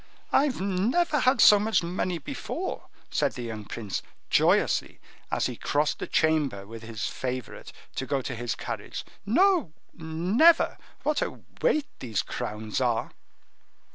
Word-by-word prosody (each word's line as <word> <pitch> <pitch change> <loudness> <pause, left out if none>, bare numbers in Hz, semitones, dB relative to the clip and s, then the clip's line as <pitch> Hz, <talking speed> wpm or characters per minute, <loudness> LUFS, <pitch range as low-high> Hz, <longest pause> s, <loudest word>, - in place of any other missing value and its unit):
"I 285 - +5
never 245 - +1
had 255 +2 +3
so 210 - +9
much 215 -3 +2
money 180 +1 -1
before," 145 - -5 0.2
said - - +1
the 125 - -6
young 110 -3 -6
prince, 105 -3 -4 0.3
joyously, - - +3 0.3
as - - 0
he - - -2
crossed 150 +1 0
the - - -4
chamber 150 -11 +1
with 115 +2 -9
his 110 -1 -5
favorite 130 -2 -5 0.3
to 130 - -2
go 140 -2 0
to 130 - -4
his 120 0 -3
carriage. - - -5 0.2
"No, 345 - +3 0.2
never! 180 - +3 0.2
What 300 -1 +1
a - - -3 0.2
weight 310 - +3
these 115 -5 -1
crowns 105 +3 -4
are!" 120 -3 0
160 Hz, 140 wpm, -27 LUFS, -, 0.3 s, so